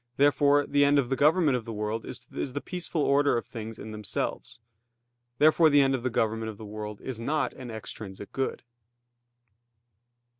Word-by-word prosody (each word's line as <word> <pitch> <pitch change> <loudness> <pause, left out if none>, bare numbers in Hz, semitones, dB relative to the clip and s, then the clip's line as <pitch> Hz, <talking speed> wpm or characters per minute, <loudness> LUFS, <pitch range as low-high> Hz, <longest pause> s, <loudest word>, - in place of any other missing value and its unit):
Therefore 145 0 +4
the 145 0 +3
end 145 0 +4
of 130 -4 +1
the 135 - +1
government 150 0 +4
of 125 - -2
the 115 - -7
world 105 +1 -3
is - - -5 0.3
the 145 - -2
peaceful 175 -2 -3
order 140 -2 +3
in 115 - -2
things 110 -1 -8
themselves. 105 +1 -3 0.8
Therefore 155 +2 +6
the 145 -1 +6
end 135 0 +3
of 130 - -1
the 130 - -1
government 110 -1 0
of 105 - -8
the 110 - -9
world 105 0 -6
is 130 -4 -5
not 150 +6 -1
an 125 -2 -9
extrinsic 105 -3 -8
good. 135 0 -2
130 Hz, 175 wpm, -28 LUFS, 110-145 Hz, 0.8 s, Therefore